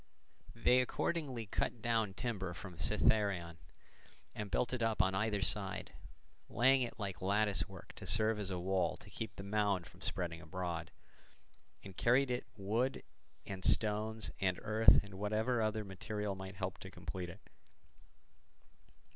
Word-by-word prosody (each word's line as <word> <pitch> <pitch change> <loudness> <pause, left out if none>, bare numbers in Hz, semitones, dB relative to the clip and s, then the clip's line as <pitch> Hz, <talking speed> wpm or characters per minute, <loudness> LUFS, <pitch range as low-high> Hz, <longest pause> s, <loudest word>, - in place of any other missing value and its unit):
They 125 +1 +5
accordingly 130 -2 -1
cut 110 +3 -1
down 110 -4 0
timber 95 -7 -3
from 90 -1 -8
Cithaeron, 90 -3 +2 0.8
and 105 -1 -5
built 125 - 0
it 125 - -1
up 115 -1 +1
on 95 0 +4
either 105 0 +1
side, 100 -2 -1 0.6
laying 130 +3 +5
it 120 -2 -3
like 95 -5 -4
lattice 100 +2 +2
work - - -11
to - - -7
serve 110 0 +3
as 100 -2 -2
a 90 - -2
wall 90 -1 0
to 100 - -15
keep 110 +2 -5
the 100 - -7
mound 100 -3 +1
from - - -15
spreading 85 -2 -1
abroad, 85 +1 -4 0.9
and 95 -2 -10
carried 125 +5 +4
to - - +1
it - - -12
wood 110 +7 0 0.4
and 95 -2 -6
stones 110 +1 +2
and 95 -2 +2
earth 110 +1 +6
and 95 -2 -10
whatever 110 +4 +1
other 110 0 0
material 105 +2 -3
might 95 0 -7
help 95 0 -4
to 95 - -8
complete 90 -1 -6
it. 95 +4 -11
105 Hz, 155 wpm, -36 LUFS, 95-110 Hz, 0.9 s, earth